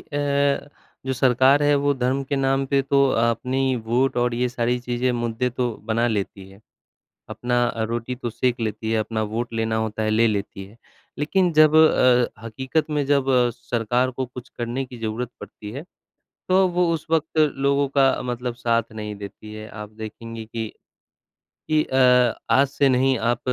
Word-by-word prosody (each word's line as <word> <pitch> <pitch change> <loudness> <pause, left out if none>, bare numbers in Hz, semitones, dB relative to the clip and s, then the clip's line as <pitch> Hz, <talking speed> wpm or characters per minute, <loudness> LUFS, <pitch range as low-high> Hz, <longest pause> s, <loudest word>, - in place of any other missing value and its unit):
अ, 145 0 0 0.4
जो 130 - 0
सरकार 130 +3 +4
है 145 0 +4
वो 145 0 +2
धर्म 130 +1 0
के 140 +1 -2
नाम 135 0 +1
पे 140 0 +2
तो 140 0 +3
अपनी 125 +3 +1
वोट 125 +3 +1
और 120 0 +1
ये 125 +1 0
सारी 120 0 -1
चीज़ें 125 +1 -1
मुद्दे 120 +1 -1
तो 125 0 -2
बना 115 +1 +1
लेती 100 -2 -4
है, 95 +2 -17 0.7
अपना 120 0 0 0.2
रोटी 120 +2 -3
तो 120 -2 -4
सेक 120 +1 -1
लेती 110 0 -3
है, 110 - +2
अपना 110 0 -2
वोट 115 +3 -3
लेना 110 0 -1
होता 110 0 -2
है, 110 - 0
ले 115 +2 +3
लेती 100 -2 -3
है, 105 +4 -16 0.4
लेकिन 175 +4 +1
जब 155 0 +5
अ, 125 -7 +4
हकीकत 130 +7 -2
में 145 -2 0
जब 140 -2 +2 0.3
सरकार 120 +2 0
को 130 +1 -4
कुछ 125 0 -10
करने 120 +3 -2
की 125 -1 -11
ज़रूरत 115 +2 -3
पड़ती 105 +1 -9
है, 140 +7 -7 0.6
तो 190 +1 +4
वो 175 0 +1
उस 160 0 -5
वक़्त 160 0 0
लोगों 140 -1 +2
का 135 -1 +3
अ, - - -3
मतलब 125 -1 -4
साथ 115 -2 -1
नहीं 105 -1 -6
देती 100 +1 -10
है 110 0 -8
आप 105 -1 -9
देखेंगे 115 +1 -7
कि 110 0 -5 1.0
कि 155 0 +3
अ, 125 -2 +4 0.2
आज 140 +1 +4
से 140 0 +1
नहीं 130 +1 +2
आप 120 +2 0
125 Hz, 180 wpm, -23 LUFS, 115-135 Hz, 1.0 s, जब